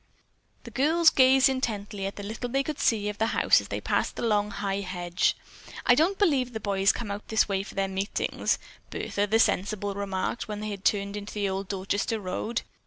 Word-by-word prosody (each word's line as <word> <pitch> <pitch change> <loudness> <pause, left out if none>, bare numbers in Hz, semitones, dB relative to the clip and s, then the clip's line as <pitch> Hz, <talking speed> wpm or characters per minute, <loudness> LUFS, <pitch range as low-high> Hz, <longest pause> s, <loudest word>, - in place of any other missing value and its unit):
The - - -10
girls 320 +4 +4
gazed 265 +1 +6
intently 210 -7 -2
at 195 - -6
the 205 - -7
little 220 +4 -5
they 270 +3 +1
could 300 +1 -5
see 210 -3 +2
of 210 0 -4
the 220 - +2
house - - +5
as - - -10
they - - -3
passed - - -1
the - - -5
long 210 -2 +2
high 195 -1 -2
hedge. 180 -2 -1 0.5
"I 250 - +7
don't 335 +9 +2
believe 275 - +2
the 220 - -3
boys 200 -1 +2
come 235 -4 -6
way - - -1
out 205 - -7
here 200 -3 +1
for - - -11
their 195 0 0
meetings," 195 +1 -1 0.3
Bertha, 205 0 -2
the 220 +2 +3
sensible, 205 -1 +1
remarked 200 +3 -3
when 210 -1 -5
they 215 - -3
had 195 -1 -7
turned 200 -1 +1
into 205 +1 -7
the 205 -1 0
old 190 0 -3
Dorchester 200 +4 -1
road. 215 +4 -3
205 Hz, 210 wpm, -27 LUFS, 195-240 Hz, 0.5 s, I